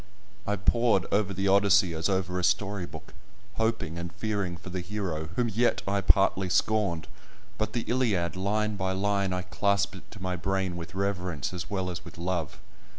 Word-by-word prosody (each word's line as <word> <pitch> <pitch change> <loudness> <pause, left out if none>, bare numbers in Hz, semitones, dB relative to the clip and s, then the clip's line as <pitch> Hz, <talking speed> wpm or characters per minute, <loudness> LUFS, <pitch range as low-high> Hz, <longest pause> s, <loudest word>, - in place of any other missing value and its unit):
I 105 - +2
pored 105 -1 +3
over 100 -1 +2
the 95 +1 -1
Odyssey 100 -2 +5
as 80 +4 0
over 90 -1 0
a - - -2
story 95 +1 +1
book, - - -11 0.4
hoping 110 -7 0
and 85 0 -5
fearing 100 -3 -2
for 90 - -9
the 90 0 -2
hero 90 -5 -3
whom 120 - +2
yet 115 +3 +1
I 100 0 +1
partly 95 -1 +3
scorned. 100 -4 +1 0.5
But 110 0 -1
the 120 - 0
Iliad—line 105 -2 +1
by 95 -1 0
line 100 0 +1
I 90 0 -1
clasped 100 +1 +1
it 95 - -13
to 105 - -11
my 95 -1 -2
brain 95 0 -1
with 85 0 -7
reverence 90 -6 -1
as 90 +1 -5
well 95 -2 -1
as 85 0 -6
with 85 -1 -11
love. 85 -3 -2
95 Hz, 180 wpm, -28 LUFS, 90-100 Hz, 0.5 s, Odyssey